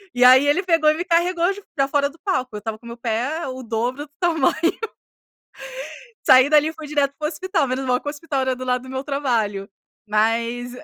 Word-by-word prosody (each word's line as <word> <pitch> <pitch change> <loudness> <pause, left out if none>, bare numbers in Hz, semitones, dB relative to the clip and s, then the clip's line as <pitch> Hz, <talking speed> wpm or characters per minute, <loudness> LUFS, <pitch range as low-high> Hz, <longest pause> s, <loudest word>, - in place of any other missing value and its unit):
E 245 - +3
aí 260 +3 +8
ele 290 +6 +3
pegou 330 -4 +3
e - - -1
me 350 - -3
carregou 345 +1 +2
j 405 0 -12
pra 275 -2 +2
fora 280 0 +1
do 325 - -19
palco. 310 - -2
Eu 210 - -4
estava 220 +1 -5
com 235 - -19
meu 235 - -8
pé 245 +8 -2
o 260 0 -6
dobro 240 +5 -2
do - - -46
tamanho. 325 -6 +2 1.7
Saí 260 +2 +7
dali 305 0 +4
e 320 - -8
fui 310 -2 -9
direto 285 -2 0
para 305 - -4
o - - -2
hospital, 370 -5 -1
menos 260 +1 -2
mal 250 0 +1
que - - -11
o - - +1
hospital 295 -2 -3
era 260 0 0
do 255 0 -7
lado 250 0 0
do 260 - -11
meu 265 +1 -4
trabalho, 230 -8 -1 0.4
mas 230 +3 0
270 Hz, 225 wpm, -22 LUFS, 245-310 Hz, 1.7 s, aí